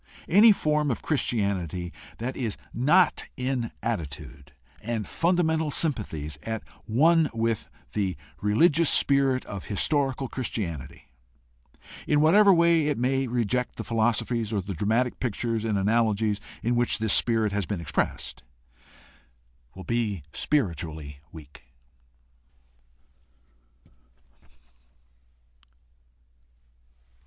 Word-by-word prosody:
Any 210 Hz, +5 st, +7 dB
form 150 Hz, -6 st, +1 dB
of 115 Hz, -, -3 dB
Chris 150 Hz, -4 st, +1 dB
tianity 90 Hz, -6 st, -2 dB, 0.3 s
that 125 Hz, +3 st, -4 dB
is 115 Hz, -6 st, -3 dB, 0.2 s
not 155 Hz, +10 st, +3 dB
in 125 Hz, -2 st, -2 dB
attitude 70 Hz, -, -5 dB, 0.3 s
and 110 Hz, -2 st, -3 dB
fundamental 160 Hz, -2 st, +1 dB
sympathies 105 Hz, -, -2 dB
at 110 Hz, -1 st, -4 dB, 0.2 s
one 160 Hz, +7 st, +4 dB
with 115 Hz, -1 st, -1 dB, 0.2 s
the 95 Hz, -5 st, -1 dB, 0.2 s
religious 150 Hz, -, +4 dB
spirit 135 Hz, -2 st, +3 dB
of 100 Hz, -2 st, -7 dB
historical 135 Hz, +4 st, 0 dB
Christianity, 85 Hz, -, -5 dB, 1.0 s
in 150 Hz, -, +3 dB
whatever 195 Hz, +7 st, +6 dB
way 170 Hz, -3 st, +4 dB
it 150 Hz, -, 0 dB
may 130 Hz, +2 st, 0 dB
reject 125 Hz, +1 st, -1 dB
the -, -, -5 dB
philosophies 115 Hz, 0 st, 0 dB
or 105 Hz, -, 0 dB
the 100 Hz, +1 st, -5 dB
dramatic 110 Hz, +8 st, 0 dB
pictures 115 Hz, -2 st, -2 dB
and 110 Hz, -3 st, 0 dB
analogies 105 Hz, 0 st, +1 dB, 0.2 s
in 120 Hz, +1 st, +1 dB
which 120 Hz, 0 st, +2 dB
this 110 Hz, -2 st, +1 dB
spirit 115 Hz, -3 st, +2 dB
has 100 Hz, -3 st, -2 dB
been 100 Hz, -, -3 dB
expressed, 85 Hz, -, -2 dB, 1.3 s
will 95 Hz, -, -9 dB
be 110 Hz, -8 st, -2 dB
spiritually 80 Hz, -, -2 dB
weak. 75 Hz, -3 st, -13 dB
115 Hz, 105 wpm, -26 LUFS, 100-140 Hz, 1.3 s, Any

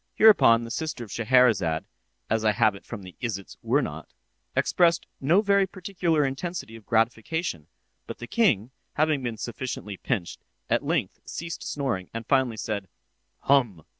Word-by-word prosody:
Hereupon 160 Hz, -, +6 dB
the 115 Hz, -, -7 dB
sister 155 Hz, -3 st, -3 dB
of 105 Hz, -, -11 dB
Scheherazade, 110 Hz, -9 st, +3 dB, 0.4 s
as 110 Hz, -1 st, 0 dB
I 110 Hz, -1 st, +3 dB
have 105 Hz, +1 st, +3 dB
it 100 Hz, -, -13 dB
from 110 Hz, -5 st, -7 dB
the 90 Hz, -1 st, -11 dB
"Isitsöornot," 105 Hz, -6 st, -2 dB, 0.5 s
expressed 170 Hz, -1 st, +3 dB
no 165 Hz, +9 st, +4 dB
very 200 Hz, -2 st, +3 dB
particular 175 Hz, -5 st, 0 dB
intensity 135 Hz, -2 st, -4 dB
of 110 Hz, -2 st, -14 dB
gratification; 115 Hz, -, 0 dB, 0.4 s
but -, -, -6 dB
the 120 Hz, -, -7 dB
king, 125 Hz, -, +2 dB, 0.2 s
having 155 Hz, -2 st, +2 dB
been 120 Hz, -3 st, -3 dB
sufficiently 115 Hz, -4 st, -5 dB
pinched, 100 Hz, -8 st, -3 dB, 0.3 s
at -, -, +2 dB
length -, -, -1 dB
ceased 165 Hz, 0 st, -6 dB
snoring, 125 Hz, -11 st, -2 dB
and 115 Hz, 0 st, -4 dB
finally 130 Hz, -4 st, +2 dB
said, 105 Hz, -2 st, -3 dB, 0.5 s
"Hum!" 120 Hz, -, +2 dB
120 Hz, 145 wpm, -26 LUFS, 110-155 Hz, 0.5 s, Hereupon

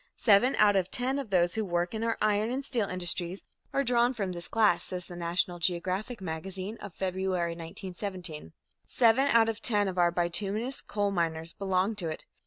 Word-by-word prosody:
"Seven 225 Hz, +4 st, +4 dB
out 205 Hz, -1 st, +5 dB
of 190 Hz, -1 st, +1 dB
ten 260 Hz, +3 st, 0 dB
of 270 Hz, -6 st, -5 dB
those 175 Hz, -2 st, +2 dB
who 220 Hz, -, 0 dB
work 175 Hz, -1 st, -1 dB
in 220 Hz, 0 st, -3 dB
our 230 Hz, 0 st, 0 dB
iron 215 Hz, +1 st, +2 dB
and 265 Hz, +2 st, -3 dB
steel 235 Hz, -7 st, -1 dB
industries 180 Hz, 0 st, -1 dB, 0.3 s
are 275 Hz, -, +1 dB
drawn 245 Hz, 0 st, +2 dB
from 200 Hz, -5 st, -2 dB
this 175 Hz, -1 st, 0 dB
class," 210 Hz, -6 st, +3 dB
says 180 Hz, -2 st, -4 dB
the 175 Hz, -, -10 dB
National 175 Hz, +1 st, -1 dB
Geographic 185 Hz, +6 st, -2 dB
Magazine 185 Hz, +4 st, -5 dB, 0.2 s
(February, 185 Hz, -1 st, -1 dB
1917), 175 Hz, -, -6 dB, 0.4 s
"seven 245 Hz, +3 st, +4 dB
out 230 Hz, -4 st, +5 dB
of 225 Hz, -1 st, -3 dB
ten 205 Hz, -4 st, +1 dB
of 185 Hz, -1 st, -3 dB
our 175 Hz, -1 st, +5 dB
bituminous 195 Hz, +8 st, 0 dB
coal 205 Hz, -1 st, -1 dB
miners 165 Hz, -2 st, -2 dB
belong 190 Hz, +2 st, 0 dB
to 170 Hz, -5 st, -2 dB
it. 155 Hz, -, -7 dB
190 Hz, 185 wpm, -29 LUFS, 175-220 Hz, 0.4 s, out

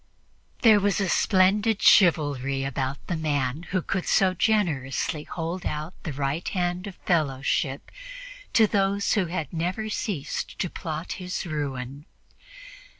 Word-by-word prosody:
There 220 Hz, -3 st, +7 dB
was 205 Hz, +1 st, +1 dB
a 195 Hz, -, +1 dB
splendid 200 Hz, +4 st, +3 dB
chivalry 140 Hz, -7 st, +4 dB
about 135 Hz, 0 st, -3 dB
the 175 Hz, -, -2 dB
man 145 Hz, -1 st, -1 dB
who 185 Hz, -2 st, 0 dB
could 190 Hz, -2 st, -2 dB
so 190 Hz, -1 st, +3 dB
generously 165 Hz, -, 0 dB
hold 170 Hz, +2 st, -4 dB
out 155 Hz, +2 st, -4 dB
the 160 Hz, -, -5 dB
right 140 Hz, +4 st, -2 dB
hand 180 Hz, +1 st, -1 dB
of 195 Hz, -, -8 dB
fellowship 140 Hz, -4 st, 0 dB, 0.6 s
to 225 Hz, -, +6 dB
those 200 Hz, -1 st, +1 dB
who 195 Hz, -4 st, +1 dB
had 165 Hz, -4 st, -4 dB
never 180 Hz, +6 st, -2 dB
ceased 185 Hz, -, -3 dB
to 180 Hz, -, -2 dB
plot 160 Hz, +1 st, -5 dB
his 180 Hz, 0 st, -4 dB
ruin. 140 Hz, -3 st, -4 dB
170 Hz, 135 wpm, -26 LUFS, 145-190 Hz, 0.6 s, There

